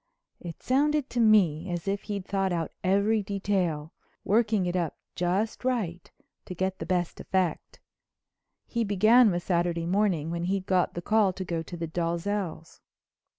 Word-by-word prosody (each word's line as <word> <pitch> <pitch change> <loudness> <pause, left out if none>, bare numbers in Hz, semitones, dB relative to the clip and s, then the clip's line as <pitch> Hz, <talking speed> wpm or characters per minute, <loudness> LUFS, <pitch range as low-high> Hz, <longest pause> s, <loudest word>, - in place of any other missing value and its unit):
It 170 -2 -9
sounded 290 +2 +1
to 245 - -2
me 190 -7 +4
as 175 +1 -4
if 200 +1 -1
he'd 200 -2 -3
thought 195 -1 0
out 165 -2 -2
every 200 +3 +2
detail, 190 -6 -2 0.3
worked 220 +2 +2
it 185 -4 +1
up 170 -4 -1 0.2
just 190 +7 -1
right 210 -10 -2 0.4
to 180 - -7
get 190 +2 -2
the - - -5
best 175 -2 -1
effect. 185 -4 -2 0.9
He 235 -1 -1
began 215 +4 +5
with 175 -2 -1
Saturday 170 -2 0
morning, 175 -4 +1
when 170 0 -2
he'd 190 +1 -1
got 185 -2 +1
the 175 - -5
call 210 -2 +3
to 185 0 -6
go 170 -2 -2
to 175 +2 -8
the 165 - -3
Dalzells'. 170 +1 -3
185 Hz, 160 wpm, -27 LUFS, 170-205 Hz, 0.9 s, began